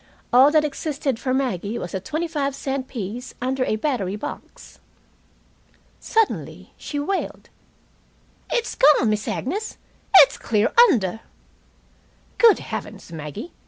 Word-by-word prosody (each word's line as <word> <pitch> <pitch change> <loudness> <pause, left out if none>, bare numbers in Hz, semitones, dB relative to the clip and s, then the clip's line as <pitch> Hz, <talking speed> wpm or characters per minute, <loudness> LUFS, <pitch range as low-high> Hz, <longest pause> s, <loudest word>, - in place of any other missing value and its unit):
All 260 +3 +7
that 305 0 +3
existed 280 -4 -3
for 255 - -2
Maggie 235 -5 -1
was 175 - -6
a 190 - -1
twenty 310 - -3
five 280 -4 -2
cent 270 -1 -3
piece 240 +2 -6
under 260 +1 -1
a 215 - 0
battery 215 -6 -2
box. 210 - -9 1.2
Suddenly 450 -2 -1
she 295 - -6
wailed: 380 +7 -3 1.0
"It's 475 - -1
gone, 270 -6 +4
Miss 215 0 -2
Agnes. 405 - -3 0.4
It's 285 - +7
clear 215 0 0 0.2
under!" 220 - 0 1.2
"Good 460 -3 +7
heavens, - - -7
Maggie! 155 - -7
260 Hz, 125 wpm, -22 LUFS, 215-300 Hz, 1.2 s, All